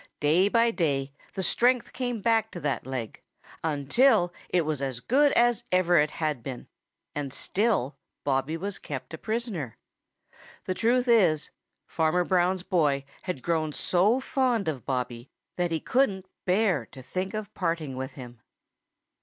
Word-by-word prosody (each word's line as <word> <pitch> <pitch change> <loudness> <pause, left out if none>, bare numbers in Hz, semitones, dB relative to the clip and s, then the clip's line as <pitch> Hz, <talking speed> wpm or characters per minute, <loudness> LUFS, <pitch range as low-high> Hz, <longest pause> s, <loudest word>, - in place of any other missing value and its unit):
Day 165 +7 +4
by 230 +1 +3
day 140 -8 -1 0.2
the 190 - -1
strength 245 +5 +2
came 245 -4 -2
back 225 0 +2
to 175 - -5
that 145 -5 -2
leg 125 -4 -5 0.4
until 175 - +3 0.2
it 175 -3 +2
was 150 -3 -2
as 130 -3 -3
good 280 - +3
as 240 -2 +3
ever 180 -1 +4
it 150 +1 +3
had 150 -6 -2
been, 125 0 -7 0.5
and 145 -2 -3
still 195 - 0 0.2
Bobby 140 +3 0
was 200 +3 -4
kept 140 +2 -7
a 160 - -6
prisoner. 215 - -3 0.9
The 185 - -1
truth 245 +5 +2
is, 180 -11 +3 0.3
Farmer 165 +2 +1
Brown's 180 0 +1
boy 150 -8 +1 0.2
had 180 -9 -4
grown 160 -3 0
so 200 - +2
fond 255 - 0
of 135 -8 -3
Bobby 125 -1 -3 0.3
that 175 -1 0
he 165 -1 -1
couldn't 200 - +1 0.2
bear 185 - +2
to 130 - -12
think 185 +8 -3
of 215 -1 -5
parting 165 -6 -2
with 130 0 -5
him. 125 -4 -11
175 Hz, 155 wpm, -27 LUFS, 140-215 Hz, 0.9 s, Day